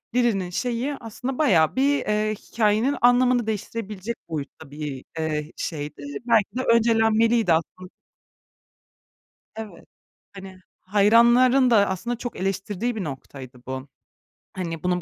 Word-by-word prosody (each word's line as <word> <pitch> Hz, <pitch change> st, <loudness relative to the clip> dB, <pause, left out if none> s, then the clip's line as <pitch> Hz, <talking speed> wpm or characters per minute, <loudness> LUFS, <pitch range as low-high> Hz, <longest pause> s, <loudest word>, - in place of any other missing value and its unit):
Lily´nin 215 Hz, -7 st, +1 dB
şeyi, 245 Hz, +7 st, -2 dB
aslında 245 Hz, +3 st, -5 dB
bayağı 180 Hz, -, +3 dB
bir, 280 Hz, +2 st, +3 dB
eee, 215 Hz, 0 st, 0 dB
hikâyenin 220 Hz, +5 st, 0 dB
anlamını 245 Hz, -1 st, +4 dB
değiştirebilecek 215 Hz, 0 st, -4 dB
boyutta 150 Hz, -1 st, -7 dB
bir, 145 Hz, -3 st, -6 dB, 0.2 s
eee, 155 Hz, -1 st, -2 dB
şeydi. 145 Hz, -2 st, -5 dB, 0.2 s
Belki 220 Hz, -2 st, +2 dB
de -, -, 0 dB
öncelenmeliydi 225 Hz, -3 st, +3 dB
aslın 180 Hz, +3 st, -3 dB, 1.7 s
Evet. 215 Hz, -5 st, -9 dB, 0.5 s
Hani, 190 Hz, -1 st, -11 dB, 0.2 s
hayranların 235 Hz, +6 st, +4 dB
da 205 Hz, -4 st, +4 dB
aslında 235 Hz, +6 st, -3 dB
çok 240 Hz, +1 st, -6 dB
eleştirdiği 195 Hz, +4 st, -2 dB
bir 210 Hz, -, -3 dB
noktaydı 135 Hz, -3 st, -8 dB
bu. 130 Hz, +1 st, -5 dB, 0.7 s
Hani, 165 Hz, -3 st, -5 dB
bunun 180 Hz, 0 st, 0 dB
210 Hz, 115 wpm, -24 LUFS, 175-235 Hz, 1.7 s, anlamını